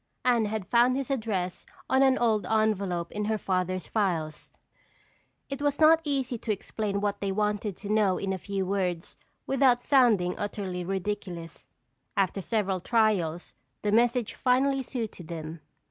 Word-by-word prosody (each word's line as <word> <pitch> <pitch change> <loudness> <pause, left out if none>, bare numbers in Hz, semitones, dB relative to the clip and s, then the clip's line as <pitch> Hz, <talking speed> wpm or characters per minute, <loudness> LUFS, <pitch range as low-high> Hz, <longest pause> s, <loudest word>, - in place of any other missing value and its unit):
Anne 240 -3 +3
had 210 -2 -3
found 245 +3 +3
his 275 -1 -3
address 210 -8 -2 0.2
on 265 0 +3
an 265 -1 +5
old 220 -3 +1
envelope 200 -6 0
in 210 0 -3
her 220 +1 0
father's 185 -2 -1
files. 165 -8 -2 1.0
It 275 0 -5
was 290 -1 0
not 320 +1 +6
easy 265 -5 -1
to 220 - -2
explain 200 0 -3
what 205 -1 -1
they 200 -1 -1
wanted 210 -1 -1
to 205 - -8
know 205 -4 +3
in 195 -1 -2
a 190 - -4
few 195 +1 -3
words 180 -3 -2 0.3
without 265 -2 +3
sounding 225 -10 +4
utterly 195 -3 -3
ridiculous. 185 -3 -5 0.5
After 195 0 +1
several 195 -2 -1
trials, 185 -6 +1 0.3
the 205 - +1
message 235 +1 +2
finally 270 +2 +2
suited 225 -9 -5
them. 160 -1 -7
210 Hz, 150 wpm, -28 LUFS, 185-240 Hz, 1.0 s, not